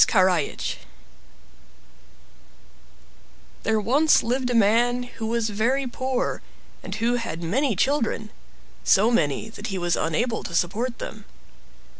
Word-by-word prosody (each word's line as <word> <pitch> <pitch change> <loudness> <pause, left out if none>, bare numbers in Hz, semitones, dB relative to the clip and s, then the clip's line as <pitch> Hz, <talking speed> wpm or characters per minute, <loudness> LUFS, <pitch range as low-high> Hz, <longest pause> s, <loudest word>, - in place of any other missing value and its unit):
Karajich 185 -6 +1 2.8
There 220 0 +1
once 280 +9 +4
lived 250 +2 -1
a 245 - 0
man 235 +3 +3
who 235 -2 -6
was 230 -1 0
very 250 +7 +1
poor, 255 0 -2 0.4
and 190 - -6
who 235 +3 +1
had 170 -8 -5
many 240 - +1
children; 225 -2 0 0.5
so 210 - +4
many 155 - +1
that 215 0 -7
he 195 -4 -3
was 175 -1 0
unable 225 +9 -1
to 170 - -6
support 225 +9 0
them. 215 -2 -8
225 Hz, 120 wpm, -24 LUFS, 195-245 Hz, 2.8 s, once